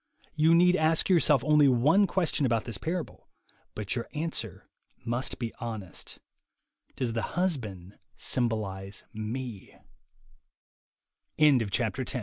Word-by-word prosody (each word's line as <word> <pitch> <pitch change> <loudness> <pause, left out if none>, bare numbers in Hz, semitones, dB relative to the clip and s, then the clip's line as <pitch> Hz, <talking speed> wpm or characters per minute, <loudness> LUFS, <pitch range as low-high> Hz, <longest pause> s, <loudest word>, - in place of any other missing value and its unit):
You 160 +2 +4
need 180 +1 +5
ask 160 +2 +2
yourself 155 -7 +4
only 150 -1 +5
one 150 - +4
question 170 -5 0
about 115 -4 +1
this 115 -5 -6
parable, 170 0 -5 0.5
but 105 0 -3
your 120 - -4
answer 150 - -4 0.4
must 120 +3 -2
be 115 -2 -4
honest: 110 -6 -6 0.8
"Does 120 -3 -1
the 115 - -1 0.2
husband 110 - -2 0.2
symboli 105 -5 -2
130 Hz, 100 wpm, -28 LUFS, 110-160 Hz, 0.8 s, need